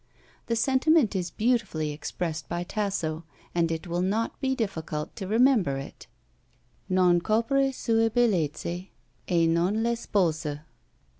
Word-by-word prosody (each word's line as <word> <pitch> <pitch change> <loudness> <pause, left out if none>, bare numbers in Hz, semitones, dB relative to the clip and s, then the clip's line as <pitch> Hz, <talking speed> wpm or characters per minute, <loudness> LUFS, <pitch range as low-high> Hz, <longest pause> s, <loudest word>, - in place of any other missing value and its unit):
The 230 - 0
sentiment 265 0 +3
is 180 -2 -1
beautifully 210 -9 0
expressed 155 0 -4
by 175 0 -2
Tasso, 175 -5 -2 0.3
and 170 -1 +1
it 165 +3 -3
will 175 0 -2
not 215 +8 -1
be 265 -1 +1
difficult 160 -9 -4
to 195 -4 -5
remember 220 - +3
it: 135 - -9 0.8
"Non 180 -2 +4
copre 250 +7 +2
sue 225 -3 +1
bellezze, 180 - 0 0.4
e 170 -2 +3
non 175 +7 +1
l'espose." 165 -10 0
185 Hz, 125 wpm, -27 LUFS, 165-230 Hz, 0.8 s, Non